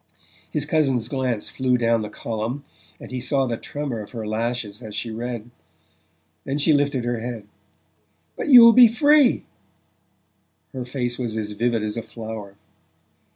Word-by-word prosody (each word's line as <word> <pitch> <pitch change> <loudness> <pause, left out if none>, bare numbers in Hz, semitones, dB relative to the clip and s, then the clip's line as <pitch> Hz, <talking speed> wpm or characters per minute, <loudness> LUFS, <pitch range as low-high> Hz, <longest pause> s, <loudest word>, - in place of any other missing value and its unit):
His 150 -1 -2
cousin's 135 -7 +1
glance 130 -5 -2
flew 130 -1 0
down 115 -1 +2
the 105 - -5
column, 115 +6 -4 0.3
and - - -11
he 130 -1 -4
saw 135 +1 +1
the 120 -2 -2
tremor 140 -1 -5
of 105 - -8
her 115 -2 -5
lashes 110 0 -3
as 110 -3 -8
she 115 - -4
read. 120 0 -5 0.9
Then 135 +1 -2
she 150 +2 +3
lifted 140 -4 +1
her 120 -1 -1
head. 115 -3 -6 0.9
"But - - -4
you'll 235 -3 +10
be 245 0 +9
free!" 285 +3 +4 1.3
Her 130 -2 -5
face 125 -1 -3
was 115 -3 -3
as 105 -1 -3
vivid 115 +1 0
as 105 +1 -4
a - - -1
flower. 110 -3 -8
120 Hz, 155 wpm, -23 LUFS, 110-135 Hz, 1.3 s, you'll